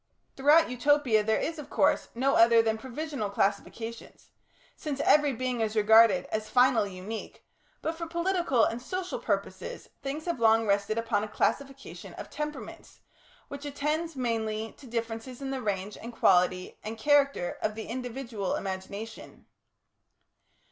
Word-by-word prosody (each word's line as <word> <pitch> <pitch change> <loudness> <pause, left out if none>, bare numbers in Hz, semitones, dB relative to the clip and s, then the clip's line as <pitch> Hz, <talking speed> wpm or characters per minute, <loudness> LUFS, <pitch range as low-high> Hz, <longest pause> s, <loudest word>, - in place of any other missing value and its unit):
Throughout 295 +2 +5
Utopia 250 -4 +3
there 220 +1 +2
is, 320 -1 -3
of 295 - -9
course, - - +2
no 265 +3 +2
other 230 0 +6
than 220 -1 0
provisional 265 -2 -4
classifications, 225 +3 -3 0.4
since 290 -3 -4
every 295 -1 +4
being 255 -1 -2
is 220 0 -1
regarded 215 -3 +6
as 215 0 -2
finally 245 -5 +3
unique, 210 +5 -7 0.4
but 320 - -1
for 335 0 -6
political 340 -7 +1
and 235 +2 -3
social 365 +7 -4
purposes - - -3
things 285 +3 -4
have 340 -7 -2
long 225 0 +4
rested 200 +1 +1
upon 225 -3 0
a - - -3
classification 275 +5 -3
of - - -9
temperaments, 300 0 -7 0.5
which 280 0 -8
attends 300 +3 -2
mainly 225 -3 -2
to 270 - -12
differences 230 +1 -4
in 270 -1 -4
the 265 -1 -3
range 200 -2 -3
and 235 +1 -8
quality 180 -3 +2
and 220 +1 -5
character 280 -6 +2
of 215 0 -1
the 220 - -6
individual 240 -4 -4
imagination. 200 +3 -7
235 Hz, 145 wpm, -28 LUFS, 220-280 Hz, 0.5 s, other